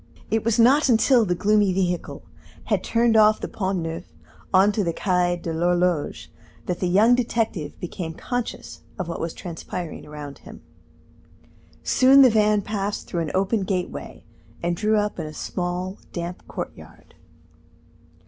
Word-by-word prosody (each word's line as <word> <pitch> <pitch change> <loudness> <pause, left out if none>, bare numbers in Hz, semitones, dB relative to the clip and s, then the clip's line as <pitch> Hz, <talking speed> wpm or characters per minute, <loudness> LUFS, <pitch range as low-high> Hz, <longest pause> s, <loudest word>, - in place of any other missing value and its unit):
It 220 -1 +1
was 230 0 +1
not 265 +5 +5
until 235 0 +4
the 180 -2 0
gloomy 205 +1 +3
vehicle 180 -2 -2 0.4
had - - 0
turned 230 0 +2
off 215 0 +5
the - - -4
Pont 190 -1 -2
Neuf 165 +2 -5 0.5
on 195 +2 +5
to 205 0 -1
the 170 -2 -1
Quai 180 -1 +1
de 170 -1 -5
l'Horloge 175 -1 0 0.3
that 180 - -3
the 180 - 0
young 210 +7 +5
detective 225 -9 -1
became 170 -2 -5
conscious 245 +3 -5 0.2
of 185 - -4
what 170 - -4
was 165 0 -3
transpiring 170 -1 -7
around 150 -2 -8
him. - - -13 1.2
Soon 270 +2 +6
the 255 - +6
van 210 -1 +3
passed 205 0 -3
through 170 - -3
an 155 -3 -3
open 195 +3 +1
gateway, 185 -1 -4 0.4
and 175 0 0
drew 215 +3 +1
up 210 -2 -1
in 160 - -3
a 155 - -8
small, 180 +3 -4
damp 175 +1 -6
courtyard. - - -9
190 Hz, 155 wpm, -23 LUFS, 175-215 Hz, 1.2 s, Soon